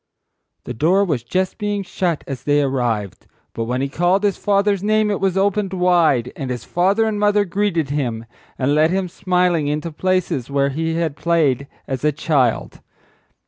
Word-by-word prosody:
The 125 Hz, -, -6 dB
door 180 Hz, -, +2 dB
was 150 Hz, -10 st, -1 dB
just 185 Hz, -, -2 dB
being 205 Hz, -1 st, -2 dB
shut 175 Hz, -3 st, -2 dB
as 135 Hz, -3 st, -6 dB
they 145 Hz, 0 st, +2 dB
arrived, 115 Hz, -9 st, -2 dB, 0.3 s
but 115 Hz, -, -3 dB
when 125 Hz, +2 st, -2 dB
he 140 Hz, -, 0 dB
called 175 Hz, +7 st, +1 dB
his 205 Hz, -2 st, +2 dB
father's 200 Hz, -1 st, +1 dB
name 215 Hz, +1 st, +2 dB
it 200 Hz, -, -1 dB
was 195 Hz, -1 st, 0 dB
opened 195 Hz, 0 st, +1 dB
wide—and 160 Hz, -8 st, +1 dB
his 125 Hz, -2 st, -4 dB
father 195 Hz, +5 st, +1 dB
and 215 Hz, -2 st, -1 dB
mother 205 Hz, 0 st, +3 dB
greeted 175 Hz, -6 st, -1 dB
him—and 130 Hz, 0 st, -3 dB
led 155 Hz, +2 st, +4 dB
him 190 Hz, +1 st, -1 dB
smiling 180 Hz, -4 st, 0 dB
into 150 Hz, +3 st, -2 dB
places 180 Hz, -6 st, -1 dB
where 140 Hz, 0 st, +1 dB
he 160 Hz, +3 st, -2 dB
had 165 Hz, -3 st, -1 dB
played 150 Hz, -5 st, +1 dB, 0.2 s
as 130 Hz, -1 st, -4 dB
a 150 Hz, -, +3 dB
child. 140 Hz, -5 st, 0 dB
165 Hz, 170 wpm, -20 LUFS, 135-195 Hz, 0.3 s, led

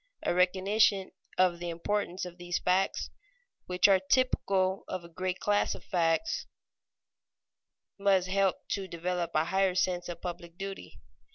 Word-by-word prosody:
A -, -, +1 dB
recognition 190 Hz, +2 st, +3 dB, 0.3 s
of 180 Hz, -2 st, +3 dB
the 175 Hz, 0 st, -4 dB
importance 180 Hz, +2 st, -2 dB
of 175 Hz, -1 st, -10 dB
these 175 Hz, 0 st, -2 dB
facts, 185 Hz, +2 st, 0 dB, 0.6 s
which 180 Hz, +1 st, +4 dB
are 195 Hz, -1 st, +5 dB
typical 190 Hz, -3 st, +1 dB
of 185 Hz, -2 st, -4 dB
a -, -, -10 dB
great 185 Hz, +2 st, -3 dB
class 205 Hz, 0 st, +1 dB
of -, -, -12 dB
facts, 175 Hz, -, 0 dB, 1.5 s
must 195 Hz, -2 st, +3 dB
help 195 Hz, 0 st, +1 dB
to 195 Hz, -1 st, -2 dB
develop 175 Hz, 0 st, -2 dB
a 155 Hz, +1 st, +3 dB
higher 190 Hz, 0 st, +1 dB
sense 180 Hz, -1 st, 0 dB
of 170 Hz, -1 st, -6 dB
public 170 Hz, -1 st, -7 dB
duty. 195 Hz, 0 st, -7 dB
185 Hz, 145 wpm, -30 LUFS, 175-195 Hz, 1.5 s, are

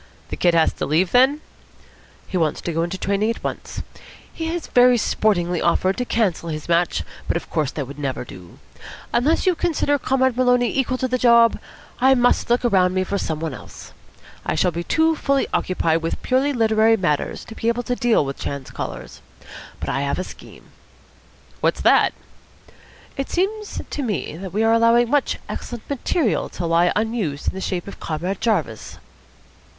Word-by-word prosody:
"The -, -, -4 dB
Kid 175 Hz, -1 st, +2 dB
has 165 Hz, -1 st, +4 dB
had -, -, -22 dB
to -, -, -1 dB
leave 170 Hz, +5 st, +2 dB
then?" 265 Hz, +4 st, +4 dB, 0.8 s
"He -, -, -7 dB
wants 160 Hz, -4 st, +1 dB
to 170 Hz, -, -3 dB
go 165 Hz, -, 0 dB
into 175 Hz, +3 st, -2 dB
training 200 Hz, +3 st, 0 dB
at 230 Hz, -, -4 dB
once. -, -, -5 dB, 0.5 s
He 325 Hz, +1 st, -3 dB, 0.2 s
very 245 Hz, 0 st, +6 dB
sportingly 180 Hz, -6 st, +1 dB
offered 185 Hz, +2 st, +2 dB
to 250 Hz, -, -1 dB
cancel 190 Hz, -8 st, 0 dB
his 155 Hz, -1 st, -5 dB
match, 170 Hz, +1 st, +1 dB, 0.2 s
but -, -, +1 dB
of -, -, -9 dB
course 155 Hz, -4 st, 0 dB
that 145 Hz, -, -3 dB
would 140 Hz, +3 st, -10 dB
never 135 Hz, -3 st, -3 dB
do. 90 Hz, -6 st, -13 dB, 0.6 s
Unless 285 Hz, +7 st, +2 dB
you 370 Hz, -, +4 dB
consider 315 Hz, -4 st, 0 dB
Comrade 260 Hz, -1 st, +1 dB
Maloney 245 Hz, -1 st, +2 dB
equal 260 Hz, -1 st, 0 dB
to 260 Hz, -, -1 dB
the 255 Hz, 0 st, -1 dB
job, 235 Hz, -1 st, +5 dB, 0.4 s
I 265 Hz, +2 st, +5 dB
must 245 Hz, -1 st, +2 dB
look 245 Hz, +1 st, +2 dB
around 185 Hz, -5 st, +3 dB
me 185 Hz, -, +2 dB
for 200 Hz, +2 st, -2 dB
some 160 Hz, -4 st, -3 dB
one 160 Hz, -3 st, -3 dB
else. -, -, -11 dB, 0.5 s
I -, -, -1 dB
shall 180 Hz, -, +2 dB
be 170 Hz, +1 st, -4 dB
too 320 Hz, -, +2 dB
fully 275 Hz, -2 st, +1 dB
occupied 165 Hz, -3 st, +1 dB
with 165 Hz, -, -3 dB
purely 265 Hz, +3 st, +2 dB
literary 225 Hz, -2 st, +3 dB
matters 150 Hz, -7 st, -1 dB
to -, -, -10 dB
be 225 Hz, -, -4 dB
able 235 Hz, +1 st, +1 dB
to 245 Hz, +1 st, -1 dB
deal 235 Hz, -11 st, +2 dB
with 135 Hz, 0 st, -5 dB
chance 140 Hz, -2 st, -5 dB
callers. -, -, -7 dB, 0.6 s
But -, -, -4 dB
I 135 Hz, -, -1 dB
have 140 Hz, 0 st, -1 dB
a 185 Hz, -, -2 dB
scheme." -, -, -13 dB, 0.9 s
"What's -, -, 0 dB
that?" -, -, +4 dB, 1.0 s
"It 275 Hz, -, -3 dB
seems 415 Hz, +4 st, -2 dB
to 295 Hz, -, -4 dB
me 210 Hz, -, -3 dB
that 190 Hz, 0 st, -7 dB
we 215 Hz, +3 st, 0 dB
are 225 Hz, 0 st, +4 dB
allowing 230 Hz, +1 st, +4 dB
much 290 Hz, -1 st, +1 dB
excellent 240 Hz, -2 st, -7 dB
material 280 Hz, -, 0 dB
to 175 Hz, -, -5 dB
lie 170 Hz, +1 st, +3 dB
unused 210 Hz, -10 st, -1 dB
in -, -, -7 dB
the 190 Hz, -, -6 dB
shape 180 Hz, -2 st, -3 dB
of 200 Hz, -, -9 dB
Comrade 175 Hz, +5 st, -3 dB
Jarvis." 170 Hz, -, -1 dB
215 Hz, 185 wpm, -21 LUFS, 170-250 Hz, 1.0 s, very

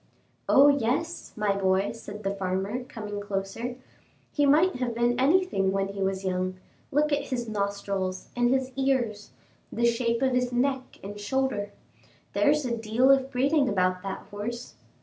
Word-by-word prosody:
"Oh, 280 Hz, +1 st, +7 dB
yes! 285 Hz, +5 st, 0 dB
my 210 Hz, -2 st, +1 dB
boy," 190 Hz, 0 st, +1 dB
said 210 Hz, -2 st, -9 dB
the 195 Hz, 0 st, -1 dB
farmer, 195 Hz, +5 st, -2 dB
coming 210 Hz, -4 st, -6 dB
closer, 205 Hz, +5 st, -4 dB, 0.6 s
"he 290 Hz, -1 st, +2 dB
might 315 Hz, +4 st, +4 dB
have 245 Hz, -2 st, -2 dB
been 240 Hz, +1 st, +1 dB
anything 275 Hz, -, +3 dB
when 195 Hz, 0 st, 0 dB
he 195 Hz, 0 st, -6 dB
was 190 Hz, 0 st, -1 dB
young; 185 Hz, 0 st, -1 dB, 0.3 s
look 300 Hz, +2 st, +2 dB
at 285 Hz, -1 st, 0 dB
his 240 Hz, -2 st, -3 dB
nostrils 200 Hz, -3 st, -2 dB
and 245 Hz, 0 st, +2 dB
his 265 Hz, 0 st, +1 dB
ears, 250 Hz, -6 st, 0 dB, 0.4 s
the 235 Hz, -, 0 dB
shape 235 Hz, +1 st, +1 dB
of 260 Hz, -1 st, +2 dB
his 250 Hz, 0 st, +1 dB
neck 260 Hz, +1 st, -1 dB
and 205 Hz, +1 st, -7 dB
shoulder; 205 Hz, -2 st, -1 dB, 0.6 s
there's 300 Hz, -1 st, +3 dB
a 235 Hz, -2 st, -1 dB
deal 225 Hz, +4 st, +3 dB
of 270 Hz, -1 st, +3 dB
breeding 275 Hz, +2 st, +2 dB
about 185 Hz, -2 st, +1 dB
that 195 Hz, 0 st, -5 dB
horse." 235 Hz, +4 st, -5 dB
235 Hz, 160 wpm, -27 LUFS, 200-265 Hz, 0.6 s, Oh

